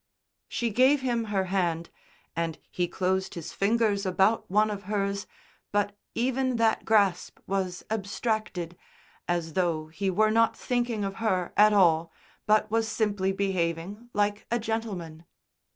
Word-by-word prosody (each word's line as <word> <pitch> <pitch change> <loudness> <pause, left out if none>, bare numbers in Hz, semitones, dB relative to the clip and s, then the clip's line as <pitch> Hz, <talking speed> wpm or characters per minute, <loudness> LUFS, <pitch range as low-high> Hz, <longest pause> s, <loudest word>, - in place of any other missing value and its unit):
She 235 -2 -1
gave 260 +5 +4
him 240 -3 0
her 200 -3 0
hand, 170 -3 0 0.4
and 165 -1 -2
he 175 -1 0
closed 190 +1 -1
his 170 -3 -6
fingers 205 -1 +1
about 190 +3 +2
one 210 +3 +3
of 205 0 -6
hers; 200 -1 -1 0.4
but 205 0 0 0.2
even 255 +1 0
that 225 -1 +2
grasp 200 -5 +2
was 185 -2 -2
abstracted, 210 -4 -2 0.5
as 170 -2 -1
though 165 -3 0
he 190 +5 -2
were 215 +4 +3
not 230 +1 +3
thinking 240 -4 -1
of 195 0 -5
her 190 -6 0
at 210 +1 +6
all, 170 -5 +4 0.4
but 215 0 +3
was 225 0 +1
simply 205 -4 0
behaving 190 +3 -2
like 205 -1 0
a 235 - +1
gentleman. 210 -8 -4
200 Hz, 140 wpm, -27 LUFS, 180-220 Hz, 0.5 s, at